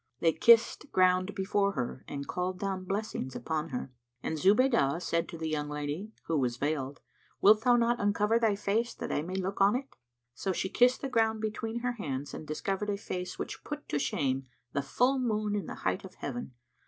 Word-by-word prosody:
They 165 -1 +3
kissed 230 - +5
ground 185 +1 +3
before 200 +1 +1
her 125 -2 -3
and 140 -1 -5
called 180 +1 -2
down 190 -1 -3
blessings 195 -9 -3
upon 160 0 -2
her; 130 -1 -4 0.3
and 160 - -1
Zubaydah 190 - +4
said 170 -1 -1
to 170 - -7
the 160 0 -3
young 150 -1 -2
lady 150 +8 -4
(who 160 -2 +1
was 125 -2 0
veiled), 140 -1 -2 0.4
"Wilt 215 +2 +6
thou 245 -1 +5
not 240 0 +2
uncover 210 +2 +2
thy 220 -3 +3
face, 220 +4 0
that - - -5
I - - +1
may 180 +4 -5
look 190 +1 -2
on 200 +3 +5
it?" 270 +2 -5 0.4
So 190 - -2
she 190 - -2
kissed 250 +4 +4
the 275 - -2
ground 225 -3 +2
between 220 +2 -3
her 245 0 0
hands 145 - -4
and 155 - -7
discovered 195 +6 -2
a 200 - 0
face 180 -2 -5
which - - -5
put 295 0 -6
to 145 - 0
shame 135 -2 -1 0.3
the 140 - +1
full 250 - +2
moon 215 -4 0
in 205 - -2
the - - -5
height 200 - 0
of 190 - -11
heaven. 125 -2 -5
190 Hz, 205 wpm, -30 LUFS, 150-220 Hz, 0.4 s, Wilt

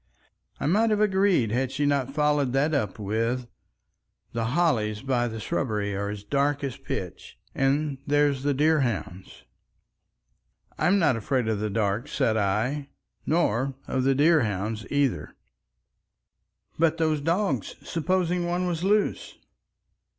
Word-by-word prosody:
I - - -3
might 210 +9 +3
have 210 -1 +1
agreed 190 - +2
had 125 +2 0
she 145 +2 -1
not 140 -2 +1
followed 145 -3 +1
that 145 +4 +2
up 115 -9 -1
with, 115 +4 -1 0.9
"The 115 -1 -1
hollies 115 -7 +1
by 125 -3 +1
the 110 -1 -6
shrubbery 105 -3 -2
are 100 +1 -2
as 105 -1 -6
dark 140 +5 0
as 135 -3 -3
pitch. - - -6 0.2
And 140 +1 0
there's 145 -2 +2
the 145 0 0
deer 155 +3 +3
hounds." 95 - -4 1.4
"I'm 180 +6 +3
not 145 -10 +3
afraid 120 +2 -1
of 110 -2 0
the 105 0 -2
dark," 105 +4 -1
said 110 -6 0
I. 110 +8 0 0.4
"Nor 135 -5 +1
of 130 - -1
the 135 0 +3
deer 155 +3 +4
hounds, 105 0 -3
either." 140 -3 0 1.4
"But 165 0 +3
those 155 -3 +1
dogs! 180 +7 -1
Supposing 175 +1 0
one 175 +1 -1
was 175 -1 -2
loose!" 205 +2 0
135 Hz, 140 wpm, -26 LUFS, 110-160 Hz, 1.4 s, deer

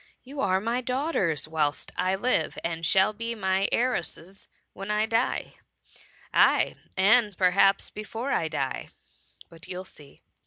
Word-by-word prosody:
You 275 +2 -9
are 190 -1 +2
my 230 +5 -1
daughters 250 - -1
whilst 155 -2 -1
I 185 +1 +1
live, 245 +6 0
and 165 0 -3
shall 190 +5 +3
be 230 +2 -4
my 190 -1 0
heiresses 195 -6 -1 0.3
when 195 +1 -8
I 210 +1 +2
die 225 +3 -1 0.4
— - - -27
^aye, - - +4 0.2
and 210 +1 +4
perhaps 195 +1 +3
before 225 +5 -5
I 160 - +1
die, 140 -4 -3 0.6
but 165 +1 -14
you'll 185 0 -6
see." 145 -6 -14
195 Hz, 145 wpm, -27 LUFS, 170-230 Hz, 0.6 s, ^aye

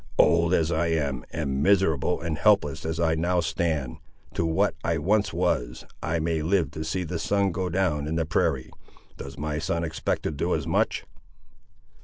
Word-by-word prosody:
"Old 85 0 +4
as 85 -2 +2
I 85 +1 +1
am, 70 -6 -1
and 70 -4 -2
miserable 90 -3 +2
and 85 -1 -2
helpless 100 -6 +2
as 80 0 -3
I 80 -1 +2
now 90 +3 +1
stand, 80 -5 -1 0.4
to 85 - 0
what 95 +6 +2
I 85 -1 +1
once 100 +5 +1
was, 65 -9 -1 0.2
I 80 +2 -1
may 80 0 0
live 80 -3 +1
to 80 - -5
see 85 +4 -2
the 85 0 -4
sun 100 +2 +1
go 90 +1 -2
down 80 -5 0
in 80 - -2
the 80 -1 0
prairie. 65 -4 0 0.5
Does 70 +1 -8
my 75 +1 -2
son 85 +1 -1
expect 80 -1 -2
to - - -1
do 75 - -1
as - - -3
much?" - - 0
80 Hz, 185 wpm, -26 LUFS, 75-90 Hz, 0.5 s, Old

